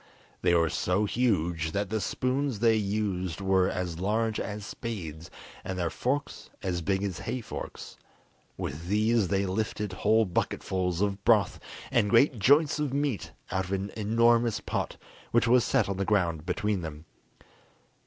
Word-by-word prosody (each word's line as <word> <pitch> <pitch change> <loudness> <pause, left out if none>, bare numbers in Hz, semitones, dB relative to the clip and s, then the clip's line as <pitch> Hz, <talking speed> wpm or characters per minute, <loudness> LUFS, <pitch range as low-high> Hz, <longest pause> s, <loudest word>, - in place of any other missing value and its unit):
They 90 -1 +3
were 85 -1 +3
so 95 +4 +1
huge 85 -9 0
that 100 0 -1
the 110 -1 0
spoons 130 +4 -1
they 115 +1 +4
used 100 -4 -1
were 95 -1 +2
as 90 -2 -3
large 110 +3 0
as 105 0 -4
spades, 85 -10 -6 0.3
and 95 0 -4
their 85 -2 -1
forks 140 +3 -2
as 90 -2 -1
big 95 +3 0
as 95 -4 -3
hay 130 - -3
forks: 115 - -8 0.6
with 80 +5 -5
these 105 +1 +2
they 100 +2 +1
lifted 105 +1 -2
whole 110 +4 +3
bucketfuls 90 0 -1
of 100 -1 -1
broth 105 -5 +3 0.3
and 105 - +3
great 120 +1 +4
joints 145 +7 +4
of 150 -3 -1
meat 140 -6 -1 0.2
out 95 0 0
of 95 - -4
an 95 +1 -2
enormous 115 +1 +3
pot - - -3 0.3
which 120 -1 +3
was 120 0 +5
set - - +2
on 100 -1 -2
the 100 - 0
ground 90 -6 0
between 105 +1 0
them. 80 -1 -7
100 Hz, 160 wpm, -28 LUFS, 90-115 Hz, 0.6 s, was